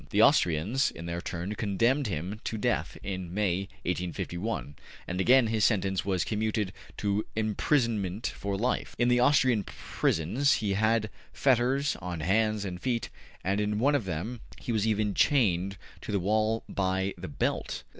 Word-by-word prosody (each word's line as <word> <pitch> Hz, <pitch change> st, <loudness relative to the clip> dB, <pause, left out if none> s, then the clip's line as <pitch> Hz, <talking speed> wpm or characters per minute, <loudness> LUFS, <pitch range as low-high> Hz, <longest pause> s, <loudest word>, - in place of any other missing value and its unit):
The -, -, +4 dB
Austrians, 90 Hz, -, +3 dB
in 85 Hz, -, -9 dB
their 85 Hz, 0 st, -3 dB
turn, 90 Hz, +3 st, -4 dB
condemned 115 Hz, +6 st, +1 dB
him 95 Hz, +4 st, -4 dB
to 110 Hz, -, -2 dB
death 105 Hz, -, -1 dB
in 95 Hz, -3 st, -4 dB
May, 95 Hz, -1 st, 0 dB
1851, 90 Hz, -1 st, -3 dB, 0.3 s
and 90 Hz, +1 st, -1 dB
again 130 Hz, +4 st, +6 dB
his 110 Hz, -1 st, 0 dB
sentence 95 Hz, -3 st, +2 dB
was 95 Hz, -2 st, 0 dB
commuted 110 Hz, -2 st, -1 dB, 0.2 s
to 100 Hz, +1 st, 0 dB
imprisonment 110 Hz, -, 0 dB
for 100 Hz, -1 st, -2 dB
life. 125 Hz, +5 st, -1 dB
In 120 Hz, 0 st, +3 dB
the 125 Hz, 0 st, +4 dB
Austrian 125 Hz, -4 st, +4 dB
prisons 115 Hz, -, 0 dB
he 105 Hz, -3 st, 0 dB
had 110 Hz, +1 st, +1 dB, 0.2 s
fetters 135 Hz, +2 st, +2 dB
on 90 Hz, -3 st, -5 dB
hands 105 Hz, +4 st, +1 dB
and 90 Hz, -2 st, -5 dB
feet, 120 Hz, -3 st, -1 dB, 0.3 s
and 100 Hz, +2 st, +1 dB
in 105 Hz, 0 st, 0 dB
one 135 Hz, +7 st, +3 dB
of 140 Hz, -8 st, +1 dB
them 95 Hz, +8 st, -4 dB, 0.2 s
he -, -, -4 dB
was 110 Hz, -1 st, +1 dB
even 105 Hz, -1 st, +1 dB
chained 100 Hz, -, +2 dB, 0.2 s
to -, -, -6 dB
the 100 Hz, -, +1 dB
wall 110 Hz, +4 st, +1 dB
by 95 Hz, 0 st, -1 dB
the 95 Hz, +1 st, -7 dB
belt. 75 Hz, -, -2 dB
105 Hz, 160 wpm, -29 LUFS, 95-115 Hz, 0.3 s, again